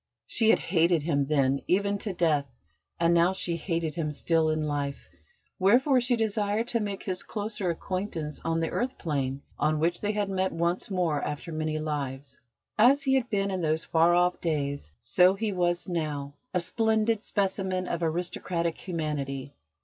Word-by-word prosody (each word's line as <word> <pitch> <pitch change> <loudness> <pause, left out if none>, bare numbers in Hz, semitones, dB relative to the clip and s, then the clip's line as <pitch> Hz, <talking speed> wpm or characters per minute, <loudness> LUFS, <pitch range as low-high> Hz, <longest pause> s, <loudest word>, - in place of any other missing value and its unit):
She 225 - +2
had - - +6
hated 170 -2 +2
him 145 -4 +1
then 140 -2 +2
even 200 +2 +1
to 205 - -3
death, 160 -6 +1 0.5
and 170 0 +4
now 170 +2 +4
she 175 -2 -1
hated 165 -2 -2
him 155 -1 -2
still 160 +1 +1
in 155 0 0
life; 145 -2 -3 0.5
wherefore 250 +7 +4
she 245 0 +2
desired 220 0 0
to 235 - +1
make 205 -2 -4
his 185 -2 -3
closer 210 -3 -3
acquaintance 170 -3 -3
on 165 0 0
the 165 - -1
earth 255 +2 -2
plane 140 -4 -2 0.2
on 155 0 +2
which 170 +2 0
they 210 0 0
had 205 -1 0
met 190 -1 0
once 170 +4 -1
more 170 -6 0
after 150 +3 -4
many 155 0 -2
lives. 140 -3 -4 0.4
As 270 +5 +6
he 265 - +2
had 255 -2 +1
been 200 -2 0
in 185 -1 -2
those 160 0 +1
far 170 +1 +4
off 180 0 +2
days, 145 - -2
so 180 +10 +4
he 215 +1 -1
was 175 -2 0
now, 150 -5 -3 0.2
a 180 - +1
splendid 220 +3 +1
specimen 190 -3 -1
of 170 - -2
aristocratic 170 0 -2
humanity. 145 -6 -3
170 Hz, 170 wpm, -28 LUFS, 155-200 Hz, 0.5 s, had